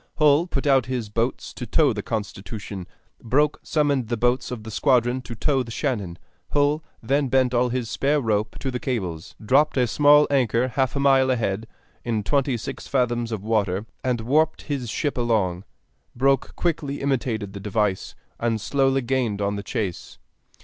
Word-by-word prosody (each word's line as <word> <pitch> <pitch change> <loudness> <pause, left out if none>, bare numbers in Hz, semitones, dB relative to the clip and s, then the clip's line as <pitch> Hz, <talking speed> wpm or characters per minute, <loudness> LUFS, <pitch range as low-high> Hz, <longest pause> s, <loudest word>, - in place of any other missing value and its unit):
Hull 150 +2 +4
put 140 -5 -3
out 135 -4 +3
his 125 -4 -3
boats 115 +4 -2
to 125 - -7
tow 145 +2 +3
the 105 - -3
Constitution; 105 -3 -5 0.3
Broke 145 +6 +1
summoned 145 -6 0
the 120 +1 -1
boats 120 +2 +1
of 120 -3 -6
the 110 - -8
squadron 125 +1 +2
to 120 -2 -8
tow 135 +3 +1
the 120 - -6
Shannon. 110 - -2 0.4
Hull 145 +2 +2 0.2
then 140 +4 +1
bent 130 -1 +2
all 125 +1 +2
his 125 -1 -2
spare 145 +6 +1
rope 110 -3 -1
to 135 - -2
the 125 - -3
cables, 95 - -4
dropped 135 +7 +3
a 125 - +4
small 145 +4 +5
anchor 125 -2 +2
half 130 +2 0
a - - 0
mile 135 -1 +4
ahead, 115 -3 -1 0.4
in 110 -3 -1
twenty 135 0 +1
six 110 - -7
fathoms 120 -3 0
of 105 -3 -4
water, 105 -3 0 0.2
and 125 -3 0
warped 155 +7 +1
his 135 -6 -3
ship 145 +3 -2
along. 100 -6 0 0.5
Broke 135 +1 +1
quickly 150 -5 -1
imitated 120 -7 -1
the 100 - -6
device, 105 -1 -1 0.2
and 115 -1 0
slowly 135 +2 +1
gained 120 -5 0
on 100 0 0
the 100 - -4
chase. 100 -3 -4
125 Hz, 175 wpm, -24 LUFS, 110-135 Hz, 0.5 s, small